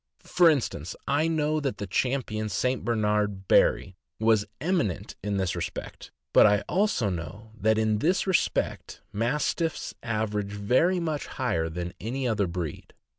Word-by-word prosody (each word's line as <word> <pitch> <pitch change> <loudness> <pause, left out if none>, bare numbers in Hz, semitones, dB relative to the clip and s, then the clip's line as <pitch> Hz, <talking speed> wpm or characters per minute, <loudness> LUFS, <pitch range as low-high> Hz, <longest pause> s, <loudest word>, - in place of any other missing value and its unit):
For 175 -2 +5
instance, 115 - -1
I 150 +3 +2
know 155 -1 +1
that 140 -3 -2
the 100 - -4
Champion 110 0 -1
St. 125 +5 -1
Bernard 105 -3 0
Barry 95 - +3 0.2
was 110 -2 +3
eminent 160 - -1
in 100 0 -2
this 95 -2 -1
respect; - - -6 0.2
but - - +8
I 105 -1 +3
also 180 - +1
know 90 +6 -7
that 110 +1 +2
in 110 -1 +1
this 175 - +1
respect 190 -2 -1
Mas 120 +8 0
tiffs 165 -3 -3
average 105 -3 -2
very 125 - +2
much 155 -4 -2
higher 80 -12 -1
than 85 +2 -5
any 125 +4 -2
other 105 -4 +1
breed. 85 -4 -6
110 Hz, 150 wpm, -27 LUFS, 100-140 Hz, 0.2 s, but